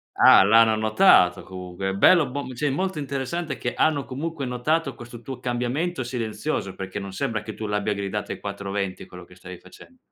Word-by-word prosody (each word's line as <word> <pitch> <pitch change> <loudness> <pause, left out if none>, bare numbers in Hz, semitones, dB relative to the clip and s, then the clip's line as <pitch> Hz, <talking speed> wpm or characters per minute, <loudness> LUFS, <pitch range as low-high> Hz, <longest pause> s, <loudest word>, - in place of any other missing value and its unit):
Ah, - - +7
l'hanno 110 +2 +5
notato 110 - +4
comunque, 95 +1 -5
bello, 150 - +5
bom 140 0 -5
sì, 135 +5 -2
molto 185 +4 -2
interessante 140 +3 -3
che 120 - -3
hanno 150 -3 +1
comunque 145 +3 -5
notato 135 +4 -1
questo 120 0 -11
tuo 125 +1 -7
cambiamento 130 +6 -2
silenzioso, 120 -2 -3
perché 95 +1 -6
non 100 -1 -7
sembra 115 -1 -2
che 110 +1 -7
tu 110 - -6
l'abbia 105 0 -1
gridato 100 +1 -4
ai - - -10
quattro 100 -1 -5
venti 100 -2 -3
quello 90 -1 -12
che 90 - -17
stavi 90 0 -10
facen 260 - -17
120 Hz, 185 wpm, -24 LUFS, 100-140 Hz, -, Ah